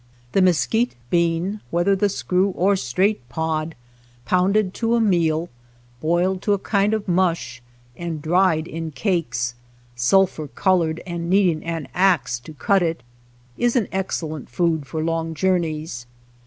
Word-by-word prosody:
The 195 - +3
mesquite 185 +7 +2 0.2
bean, 170 +4 +1
whether 175 +4 +2
the 200 +1 +1
screw 185 0 +1
or 195 +3 +3
straight 185 - 0
pod, 160 0 -2 0.5
pounded 190 +1 +2
to 230 0 0
a - - +3
meal, 170 -6 +2 0.5
boiled 175 +5 +1
to 205 - +2
a - - +2
kind 200 +2 +1
of 215 -2 -5
mush, 170 -9 0 0.3
and 170 0 -4
dried 165 0 +2
in 165 0 -5
cakes, 135 - -1 0.4
sulphur 155 +5 +2
colored 165 0 +1
and 170 -1 -4
needing 185 -4 +3
an 165 -4 -4
axe 165 -11 +2
to 140 +6 -12
cut 195 +6 +2
it, 165 -7 -1 0.6
is 240 0 +2
an 230 -6 +2
excellent 160 -6 -3
food 160 +1 0
for 160 +1 -3
long 165 0 -2
jour 185 +3 +2
neys. 155 -7 -5
170 Hz, 145 wpm, -22 LUFS, 160-190 Hz, 0.6 s, The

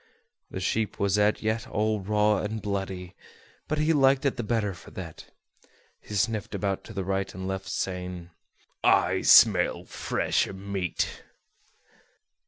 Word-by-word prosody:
The - - -5
sheep 105 +3 -1
was 100 +1 +2
as 105 +1 +2
yet 110 +1 -1
all 110 0 0
raw 105 +1 +2
and 110 +1 -3
bloody; 95 -3 -4 0.5
but 155 - -1
he 155 +2 +2
liked 135 -1 +4
it 140 - +2
the 120 - -3
better 110 -3 -1
for 85 - -13
that. 85 -4 -9 0.7
He 105 - -8
sniffed 105 +1 -1
about 100 -2 -2
to 110 - -10
the 100 -2 -3
right 95 +1 -2
and 95 0 -5
left, 95 0 -4
saying: 90 -2 -4 0.5
"I - - +3
smell - - +6
fresh - - 0
meat." 95 -2 -3
100 Hz, 145 wpm, -27 LUFS, 95-110 Hz, 0.7 s, smell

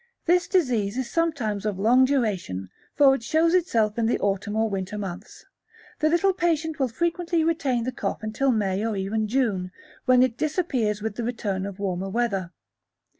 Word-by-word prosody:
This 350 +1 +3
disease 245 - +1
is 260 -2 -3
sometimes 280 -12 -1
of 210 -3 -2
long 240 +6 +5
duration, 195 - -1 0.3
for 275 -2 +6
if 270 - -1
it - - -16
shows 320 +7 +2
itself 235 - +1
in 225 - +2
the 235 - +2
autumn 200 +1 -1
or 220 0 +2
winter 195 0 -4
months, 190 -4 -7 0.5
the 310 - +3
little 345 +4 +3
patient 320 -4 -1
will 265 - +2
frequently 340 +5 0
retain 285 -7 0
the 255 - -2
cough 245 - -4
until 220 +6 0
May 200 -3 0
or 220 -2 -1
even 215 +3 -1
June, 210 -7 0 0.3
when 255 -1 +5
it 250 -2 0
disappears 260 - -1
with 220 -2 -3
the 240 - -2
return 205 -5 -2
of 200 -2 -8
warmer 190 -1 -3
weather. 195 -5 -1
230 Hz, 180 wpm, -25 LUFS, 205-295 Hz, 0.5 s, for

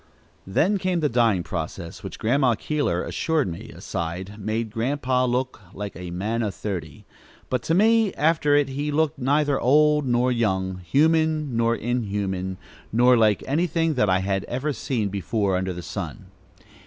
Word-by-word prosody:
Then 185 - +2
came 185 -2 0
the 150 -2 +1
dyeing 115 -7 +2
process, 85 0 -5
which - - -7
Grandma 125 +1 +2
Keeler 125 - -1
assured 160 -4 0
me, 85 -2 -7
aside, 90 +5 -5
made 110 +2 -2
Grandpa 130 +2 0
"look 125 -1 -1
like 105 0 -6
a 90 +1 -7
man 105 +7 -2
o' 110 - 0
thirty;" 95 -5 -6 0.5
but 125 -2 +1
to 160 +8 0
me, 220 +1 +4
after 150 -1 +3
it 145 -2 +3
he 145 +3 -2
looked 155 0 0
neither 145 +2 +2
old 150 +2 +4
nor 125 +1 +2
young, 95 -6 0
human 155 - +2
nor 115 0 +2
inhuman, 100 -6 -2 0.3
nor 125 +3 +5
like 110 -4 +3
anything 165 +2 +1
that 115 -7 +2
I 95 0 +3
had 95 0 -1
ever 135 +5 -2
seen 115 -7 -2
before 100 0 -1
under 95 0 -1
the 90 -1 -7
sun. - - -6
120 Hz, 160 wpm, -24 LUFS, 100-145 Hz, 0.5 s, nor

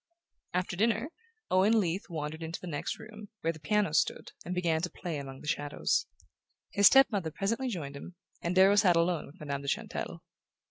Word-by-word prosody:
After 180 -1 -1
dinner 225 - +1 0.4
Owen 200 +5 +5
Leath 185 0 -2
wandered 160 -1 -4
into 165 +1 -5
the - - -9
next 150 -5 -3
room, 215 -2 -11
where 165 +1 0
the 160 - -12
piano 200 +2 +1
stood, - - +1
and 180 - -4
began 165 -3 +1
to 180 - -2
play 170 -5 -5
among 135 -1 -8
the 150 - -10
shadows. 145 - 0 0.6
His 200 -1 +7
step 270 -1 +7
mother 190 -6 -1
presently 220 - -1
joined 155 - -4
him, 175 +5 -9 0.3
and 170 +2 -1
Darrow 190 +2 +6
sat 185 -4 +5
alone 170 -1 +1
with 140 - -16
Madame 140 -2 -4
de 140 - -8
Chantelle. - - -3
175 Hz, 190 wpm, -30 LUFS, 155-205 Hz, 0.6 s, His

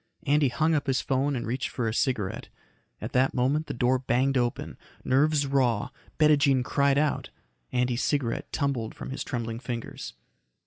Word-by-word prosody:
Andy 145 0 +3
hung 155 +6 +1
up 145 -2 0
his 130 -1 +2
phone 135 +1 0
and 120 - -3
reached 125 +3 -2
for 120 -3 -2
a 110 - -1
cigarette. 110 -6 -1 0.5
At - - -6
that 130 +1 +2
moment 140 +5 +1
the - - -4
door 125 +2 +2
banged 130 +2 +1
open. 120 -2 -1 0.3
Nerves 145 +2 +3
raw, 130 -6 +1 0.3
Bettijean 145 -4 +4
cried 140 +1 +2
out. 150 0 0 0.4
Andy's 125 0 0
cigarette 135 -6 -1
tumbled 135 -7 -2
from - - -7
his 135 - -4
trembling 115 -3 -4
fingers. 120 - -6
130 Hz, 165 wpm, -27 LUFS, 120-140 Hz, 0.5 s, Bettijean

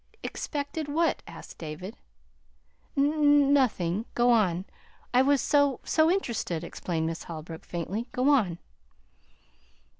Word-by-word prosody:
"Expected 290 +1 -4
what?" 325 +3 +1
asked - - -11
David. 165 +7 -7 1.0
"N 290 0 +4
nothing. 215 -7 +1
Go 240 0 +4
on. 190 -6 +2 0.5
I 250 - +6
was 280 0 +3
so 285 -3 +2
so 315 0 +3
interested," 235 - -1
explained 165 -1 -3
Miss 165 0 -4
Holbrook 160 0 -8
faintly. 190 +7 -4
"Go 255 +3 +1
on." 200 - +2
240 Hz, 115 wpm, -28 LUFS, 175-285 Hz, 1.0 s, I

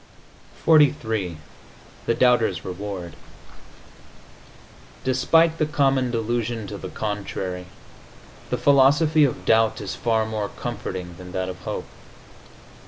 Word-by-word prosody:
XLIII 110 - +3 0.7
THE 115 - +2
DOUBTER'S 115 -8 +2
REWARD 95 -2 -6 1.9
Despite 160 +6 +3
the 155 - +2
common 135 -4 +2
delusion 115 -1 -2
to 100 0 -7
the - - -7
contrary 95 -4 -4 0.8
the 125 - 0
philosophy 145 +4 +5
of 130 - -3
doubt 110 0 +3
is 100 -3 -5
far 110 -1 0
more 110 -2 -3
comforting 95 -7 -6
than 90 0 -10
that 95 0 -2
of 90 - -7
hope. - - -5
110 Hz, 105 wpm, -23 LUFS, 100-130 Hz, 1.9 s, philosophy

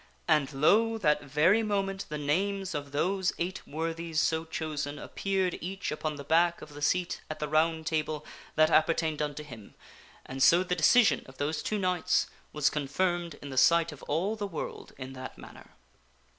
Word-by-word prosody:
And, 155 -3 +3
lo! 215 +11 +3
that 150 -8 +2
very 150 +9 +3
moment 195 -2 -2
the 150 - -3
names 190 +6 -1
of 145 -1 -5
those 185 +6 0
eight 180 +3 -4
worthies 165 +1 -3
so 160 +1 +1
chosen 150 -2 -4
appeared 190 +2 -2
each 190 +3 -4
upon 150 0 -3
the 140 - -8
back 170 +4 +3
of 150 - -12
the 145 - -9
seat 175 +4 0
at 155 - -4
the 150 - -3
Round 160 +1 +1
Table 155 -1 -2 0.3
that 155 +1 +4
apper 160 +1 +4
tained 155 -2 -1
unto 150 0 -3
him, 115 -8 -12 0.5
and 135 +1 -6
so 170 +6 +6
the 180 -1 -1
decision 215 +8 +5
of 130 0 -14
those 150 +2 -1
two 215 - -2
knights 180 -3 +1 0.3
was 150 -1 +1
confirmed 170 +3 -1
in 140 - -7
the 130 - +2
sight 170 +2 +4
of 145 - -12
all 180 +9 0
the 205 -2 -3
world 170 -5 -6
in 130 0 -7
that 130 0 -8
manner. - - -13
160 Hz, 185 wpm, -29 LUFS, 150-180 Hz, 0.5 s, so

